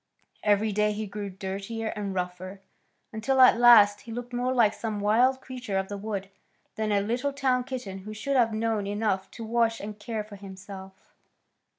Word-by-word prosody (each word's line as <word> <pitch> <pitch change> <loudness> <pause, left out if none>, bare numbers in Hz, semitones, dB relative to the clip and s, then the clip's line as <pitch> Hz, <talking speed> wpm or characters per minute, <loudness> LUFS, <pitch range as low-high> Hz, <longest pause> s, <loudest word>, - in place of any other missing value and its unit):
Every 210 +1 +2
day 210 +1 +1
he 215 +1 -4
grew 205 0 -5
dirtier 195 +4 -5
and 200 -3 -4
rougher, 185 +1 -5 0.5
until 260 +5 0
at 255 -2 +7
last 210 -4 +7
he 230 - -10
looked 245 +1 -6
more 250 +1 0
like 230 -5 +4
some 215 -1 -4
wild 245 +6 +3
creature 250 -7 -4
of 190 0 -2
the 205 - -4
wood 200 -2 -5 0.4
than 215 -1 -2
a 200 -1 +3
little 245 +7 -1
town 260 -2 +1
kitten 240 -8 -6
who 205 +3 -9
should 215 +6 -2
have 235 -3 +4
known 220 -2 -1
enough 205 -2 -1
to 230 - -9
wash 230 0 +1
and 210 +1 -7
care 220 -1 -4
for 210 -1 -12
himself. 190 0 -11
215 Hz, 185 wpm, -27 LUFS, 200-235 Hz, 0.5 s, at